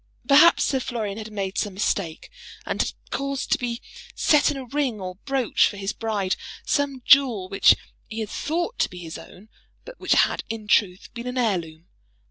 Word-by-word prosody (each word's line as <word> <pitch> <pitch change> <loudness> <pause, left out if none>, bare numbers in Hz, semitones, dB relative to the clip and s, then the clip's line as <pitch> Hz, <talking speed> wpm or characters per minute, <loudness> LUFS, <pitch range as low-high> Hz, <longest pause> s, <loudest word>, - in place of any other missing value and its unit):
Perhaps 300 +5 +7
Sir 265 - +1
Florian 220 -5 -4
had 220 0 -7
made 195 -2 -3
some 205 -3 -2
mistake, 190 - -2 0.3
and - - -1
had - - -2 0.2
caused 275 0 -3
to - - +3
be 240 0 -4 0.3
set 300 0 +4
in 290 - -2
a 265 - -6
ring 260 -4 -1
or 185 -1 -6
brooch 270 -4 +2
for 205 - -6
his 195 +1 -3
bride 210 -4 -1 0.3
some 280 -3 -1
jewel 250 -9 +5
which 195 - +5 0.3
he 220 +1 -4
had 215 - -4
thought 345 +10 -2
to - - +2
be 180 - -11
his 165 -2 -7
own, 195 +4 -14 0.4
but - - -11
which - - +2
had, - - +2
in 220 -2 -6
truth, 195 -2 +1
been 235 +1 -6
an 250 +1 -4
heirloom. 170 -9 -1
225 Hz, 190 wpm, -24 LUFS, 195-275 Hz, 0.4 s, Perhaps